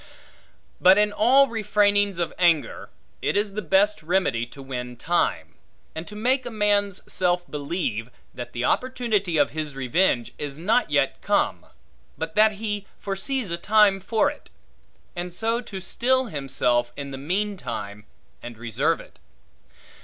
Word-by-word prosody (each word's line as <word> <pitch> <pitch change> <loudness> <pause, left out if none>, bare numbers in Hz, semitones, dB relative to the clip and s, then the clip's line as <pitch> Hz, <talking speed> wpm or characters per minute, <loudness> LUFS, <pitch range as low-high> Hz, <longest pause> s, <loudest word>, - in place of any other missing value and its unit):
But 185 +2 +7
in 210 0 +3
all 260 +6 +5
refrainings 205 -3 +2
of 170 -1 -2
anger, 170 -4 +2 0.3
it - - 0
is 205 -1 +1
the 215 - -3
best 200 +3 +2
remedy 155 -8 0
to 140 - -14
win 125 -2 -6
time; 170 +7 0 0.4
and 160 +2 -7
to 210 - -9
make 255 +5 +1
a - - -5
man's 205 -3 +1
self 175 -1 0
believe, 140 - -3 0.2
that 125 -1 -7
the 120 +1 -2
opportunity 220 - 0
of 145 -1 +3
his 150 -2 -4
revenge 130 -1 +1
is 145 -1 -5
not 215 +9 +1
yet - - +1
come, - - 0 0.5
but - - -4
that 215 +1 +5
he 205 -1 -4
foresees 200 +2 -3
a 170 - -1
time 210 0 +4
for 225 +8 +1
it; 295 - -15 0.7
and 175 0 -5
so 230 +3 0
to 200 -5 -7
still 260 +7 +1
himself 125 - 0
in 140 -1 -6
the 135 - -6
meantime, 135 - -3 0.4
and 120 -1 -9
reserve 120 +8 0
it. - - -15
190 Hz, 150 wpm, -24 LUFS, 140-210 Hz, 0.7 s, But